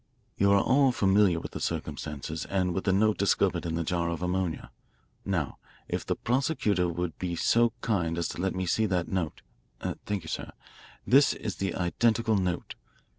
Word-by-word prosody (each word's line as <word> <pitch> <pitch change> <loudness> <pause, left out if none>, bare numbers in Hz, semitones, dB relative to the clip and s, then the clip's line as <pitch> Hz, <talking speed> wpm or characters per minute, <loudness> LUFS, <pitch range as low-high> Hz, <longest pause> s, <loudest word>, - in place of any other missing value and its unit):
You 100 0 +3
are 100 - +6
all 135 +4 +4
familiar 95 -5 +3
with - - -7
the - - -6
circumstances 75 +1 -4
and 90 -2 0
with 95 - -3
the 95 - +3
note 105 +2 +2
discovered 100 -3 +2
in 80 - -2
the 85 - -1
jar 85 0 -1
of 85 +1 -3
ammonia. 90 -2 -2 0.5
Now, 85 -8 -2 0.3
if - - -2
the - - -1
prosecutor 120 - +1
will 85 0 -2
be 90 -2 -2
so 120 +6 +3
kind 85 -7 0
as 85 - 0
to - - -5
let 95 0 -1
me 95 0 -1
see 110 +5 +1
that 90 -3 -1
note 90 -6 -2 0.4
thank 100 -3 -4
you, - - -10
sir. - - -5 0.5
This 140 +3 +5
is 100 -5 -5
the 95 -2 -2
identical 110 +5 +1
note. 90 -3 -1
95 Hz, 180 wpm, -28 LUFS, 85-105 Hz, 0.5 s, are